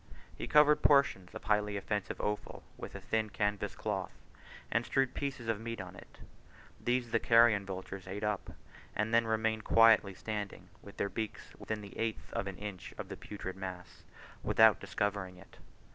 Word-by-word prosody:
He - - -5
covered 150 0 +6
portions 140 -11 +3
of - - -7
highly 105 -1 +1
offensive 100 -1 -3
offal 105 0 -3
with - - -8
a - - -5
thin 110 -1 0
canvas 105 0 -1
cloth, - - -3 0.6
and 115 +1 +2
strewed 135 +1 +1
pieces 135 -4 -4
of 110 -2 -1
meat 115 -1 -4
on 90 -1 -7
it: - - -14 0.7
these 120 -1 0
the 115 - +3
carrion 115 -4 +5
vultures 95 0 -6
ate 100 +3 -5
up, 105 -2 -1 0.5
and 105 +2 0
then 115 0 +4
remained 110 0 0
quietly 110 -4 +5
standing, 105 -2 -5
with 100 - -13
their - - 0
beaks 110 +1 -5
within 110 -1 -4
the 100 -1 -10
eighth 115 -1 -3
of 100 - -2
an 95 -2 -5
inch 100 -4 -7
of - - -6
the - - -5
putrid 95 -3 -7
mass, 95 -2 -8 0.4
without - - +5
discovering 100 -3 -2
it. 95 - -16
105 Hz, 175 wpm, -33 LUFS, 100-115 Hz, 0.7 s, covered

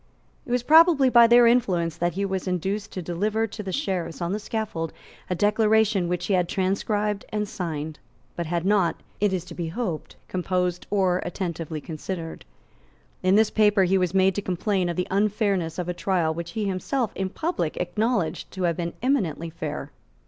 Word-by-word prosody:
It - - -6
was 245 -1 +1
probably 315 -2 +6
by 235 -1 +8
their 240 +1 +7
influence 185 -9 +2
that 175 +1 -1
he 200 +2 -1
was 190 -1 -3
induced 195 +4 -2
to 185 - -4
deliver 210 +7 0
to 215 0 -7
the 190 -2 -5
Sheriffs 185 - -2
on 170 0 -2
the 210 - -1
scaffold 210 -7 -3 0.4
a 180 - 0
declaration 210 -1 +3
which 180 0 -2
he 200 - 0
had 180 -2 +2
transcribed 205 +2 0
and 210 -1 -2
signed, 160 -5 -4 0.4
but 170 -2 -3
had 170 +1 -1
not, 190 -5 +3 0.2
it 205 -1 +2
is 180 -2 -2
to 175 - -9
be 170 -1 -4
hoped, 175 -2 -4
composed 180 -1 -1
or 185 -3 +2
attentively 165 -4 -4
considered. 165 +2 -6 0.8
In 185 +1 +3
this 220 0 +4
paper 210 -2 +4
he 190 +1 +3
was 180 0 0
made 190 0 +4
to 205 - -2
complain 185 0 0
of 170 - -2
the 180 - -1
unfairness 200 -4 +1
of 180 -1 -3
a 180 - -1
trial 175 -3 0
which 170 +1 -6
he 220 - -2
had 200 - 0
himself 220 +5 -1
in 190 -1 -2
public 255 - -2
acknowledged 200 +1 -1
to 190 - -4
have 170 -2 +1
been 170 -1 -3
eminently 175 - 0
fair. 155 -3 -5
190 Hz, 190 wpm, -25 LUFS, 170-210 Hz, 0.8 s, by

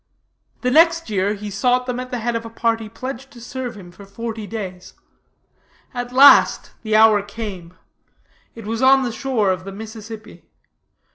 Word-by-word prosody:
The 250 - 0
next 330 -2 +4
year 200 +1 0
he 205 0 -7
sought 250 +5 +1
them 250 -1 -3
at 255 0 -6
the 250 - -3
head 235 +1 -2
of 230 - -2
a 230 - -8
party 225 -1 -1
pledged 260 +3 -7
to 240 - -13
serve 245 -1 -6
him 180 -3 -12
for 185 +3 -14
forty 220 +1 -6
days. 190 -5 -7 1.0
At 245 -1 -5
last 275 +3 +6
the 220 -1 -1
hour 215 -1 +6
came. 200 -4 -8 0.8
It 225 -2 -10
was 225 +2 -3
on 265 +1 +5
the 245 - -2
shore 225 -5 0
of 185 -1 -3
the 195 - -7
Mississippi. 220 +1 -10
225 Hz, 170 wpm, -20 LUFS, 205-250 Hz, 1.0 s, last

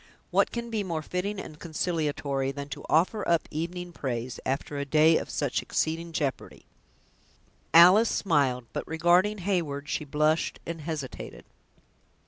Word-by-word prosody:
"What - - +3
can 235 -1 -5
be 215 -2 -1
more 165 -4 -3
fitting 190 +5 -3
and 155 -4 -9
consolatory, 150 -5 -1
than 140 +1 -7
to 135 - -7
offer 185 +6 +2
up 170 -1 +2
evening 175 +3 -4
praise, 125 -5 -4
after 140 +2 -2
a - - -1
day 155 +3 +4
of - - -4
such 145 -4 -1
exceeding 165 +1 -2
jeopardy!" 145 -4 -3 1.1
Alice 185 +7 +8
smiled; 140 - +1
but, - - -4
regarding 175 +6 +3
Heyward, 150 -8 -1
she - - -1
blushed 150 +2 0
and 165 -1 -5
hesitated. 150 -4 -6
160 Hz, 140 wpm, -27 LUFS, 145-175 Hz, 1.1 s, Alice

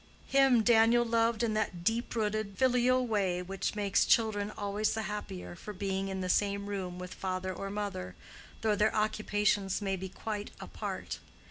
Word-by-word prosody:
Him 270 -4 +5
Daniel 235 +1 +5
loved 230 0 +2
in 225 -2 +1
that 190 -5 -2
deep 230 +4 0
rooted 215 -2 -1
filial 255 0 +3
way 195 -6 0
which 195 +3 -3
makes 200 -2 +2
children 210 -3 +2
always 205 +1 0
the 220 - -2
happier 90 - -5
for 210 - -8
being 195 0 -2
in 190 -1 -3
the 185 - -2
same 200 +2 +1
room 190 -3 -4
with 180 0 -7
father 185 0 -3
or 195 +2 -5
mother, 200 - -4 0.5
though 220 -1 +2
their 210 +1 +2
occupations 210 -2 +1
may 195 -2 -1
be 190 0 -6
quite 210 +2 -5
apart. - - -5
205 Hz, 165 wpm, -31 LUFS, 190-220 Hz, 0.5 s, Him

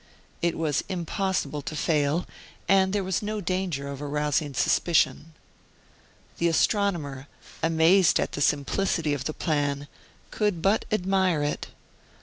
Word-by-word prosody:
It 170 -1 0
was 155 -3 0
impossible 185 -3 -2
to 155 - -6
fail, 150 +1 +1 0.4
and 190 -1 +4
there 200 0 0
was 185 -2 -1
no 215 0 -3
danger 180 -7 -2
of 140 0 -6
arousing 150 0 -1
suspicion. 165 0 +1 1.1
The 170 - +3
astronomer, 165 - 0 0.3
amazed 165 +3 +4
at - - -1
the 145 - -4
simplicity 150 +2 +1
of 135 -2 -4
the 155 - -2
plan, 145 -3 -1 0.4
could 205 -5 0
but 200 +3 +2
admire 190 -5 +1
it. 145 - -2
165 Hz, 130 wpm, -26 LUFS, 145-190 Hz, 1.1 s, and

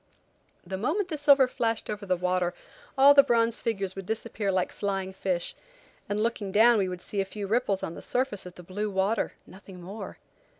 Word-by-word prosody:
The 190 +1 -5
moment 350 - 0
the 310 - -3
silver 280 -3 +6
flashed 225 -2 -1
over 210 -1 -5
the 185 -1 +2
water 180 0 0 0.4
all 275 +2 +8
the 280 - +9
bronze 230 -3 +1
figures 195 -4 -1
would 195 -1 -7
disappear 220 -2 -2
like 185 -1 0
flying 195 -2 -3
fish, 185 -2 -2 0.6
and 205 +1 -1
looking 215 -3 -1
down 225 +2 +6
we 190 -2 0
would 180 -1 -6
see 200 +2 -2
a - - +1
few 200 +1 -6
ripples 205 -2 0
on 165 - -3
the - - -9
surface 245 -7 -2
of 180 - -11
the 180 - -11
blue 205 +4 -3
water–nothing 195 -1 -3
more. 195 +5 -8
200 Hz, 195 wpm, -27 LUFS, 190-230 Hz, 0.6 s, the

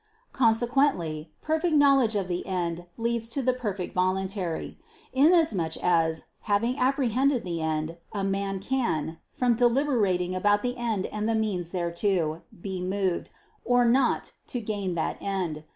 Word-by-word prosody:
Consequently 225 - +2
perfect 315 +1 +1
knowledge 275 -6 +5
of 195 -3 0
the 175 0 -2
end 175 -2 -2
leads 230 0 -1
to 270 +3 -2
the 255 +1 +3
perfect 205 -7 -4
voluntary; 185 -1 -1 0.3
inasmuch 265 - +3
as, 165 -2 +1 0.2
having 230 +5 +2
apprehended 260 0 +2
the 170 -2 -3
end, 160 +1 -2
a 200 -2 -3
man 195 0 -1
can, 185 - -1
from 245 -1 +1
deliberating 230 -7 +2
about 205 +3 +2
the 245 0 -1
end 230 -6 -1
and 215 +1 -2
the 225 - +2
means 200 -6 -1
thereto, 170 -2 -1 0.2
be 190 -2 -3
moved, 185 -1 -1 0.3
or 245 0 +3
not, 245 +2 +2 0.2
to 245 - -2
gain 205 -5 -3
that 160 - -1
end. 180 -6 -3
200 Hz, 140 wpm, -27 LUFS, 180-245 Hz, 0.3 s, knowledge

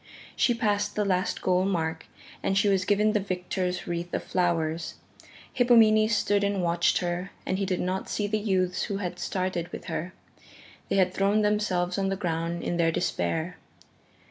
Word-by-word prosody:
She 240 - +2
passed 210 -2 0
the 210 - +1
last 185 -1 0
goal 185 0 +3
mark 160 -4 -2 0.3
and 195 - 0
she 205 +1 +3
was 190 -2 +2
given 210 +1 +3
the 210 - +2
victor's 180 -1 -3
wreath 175 0 -4
of - - -2
flowers. 165 -3 -1 0.6
Hippomenes 225 -3 +5
stood 205 0 +1
and 200 -2 0
watched 170 0 +2
her 175 +1 -2 0.2
and 190 - -1
he 195 - -1
did 185 -2 -1
not 185 +1 -2
see 205 - -1
the 215 +1 0
youths 185 -4 0
who 200 - -3
had 180 -2 -4
started 185 -2 -2
with - - -7
her 170 +2 -4 0.8
they - - +1
had 185 -1 +3
thrown 200 +3 +2
themselves 195 -3 0
on 195 0 0
the 195 - 0
ground 170 -2 -2
in 175 - -1
their 165 -1 +3
despair. 160 - -1
185 Hz, 175 wpm, -27 LUFS, 175-205 Hz, 0.8 s, Hippomenes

